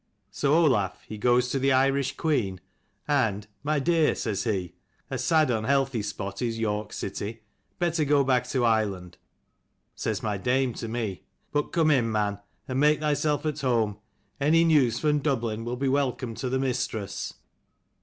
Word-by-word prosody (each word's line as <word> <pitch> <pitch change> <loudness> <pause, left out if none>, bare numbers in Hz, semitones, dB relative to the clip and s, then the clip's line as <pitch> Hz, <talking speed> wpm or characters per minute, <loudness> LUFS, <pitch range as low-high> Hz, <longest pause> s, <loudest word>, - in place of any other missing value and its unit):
So 140 +9 +1
Olaf 125 - +2
he 110 - -7
goes 125 +2 +3
to 135 - 0
the 135 +1 +2
Irish 135 +1 +2
queen 110 - 0 0.5
and 115 -9 +1 0.2
My 150 +3 0
dear, 160 +2 +2
says 105 -3 -2
he, 95 -6 -2 0.4
a - - -2
sad 155 -5 +3
unhealthy 130 +2 +1
spot 100 -1 -5
is 115 -2 -1
York 105 -2 -2
city; 105 +3 -5 0.3
better 170 -2 +1
go 145 -1 +3
back 125 -2 +1
to 125 -2 +1
Ireland. 100 -6 0 0.7
Says 110 -3 -3
my 105 -3 -1
dame 125 +3 +1
to 115 - -6
me, 110 -5 -4 0.3
but 145 0 -1
come 160 -2 +3
in, 120 -5 +2
man, 105 -2 0 0.3
and 130 0 -1
make 150 +1 +4
thyself 150 0 0
at 155 -2 -2
home. 115 -6 +1 0.4
Any 160 +4 +4
news 140 -8 +3
from 150 +1 +2
Dublin 115 -6 -1
will 120 +1 -3
be 135 +2 -1
welcome 130 -3 0
to 125 +3 -4
the 130 - 0
mistress." 120 -6 -2
125 Hz, 165 wpm, -26 LUFS, 110-145 Hz, 0.7 s, make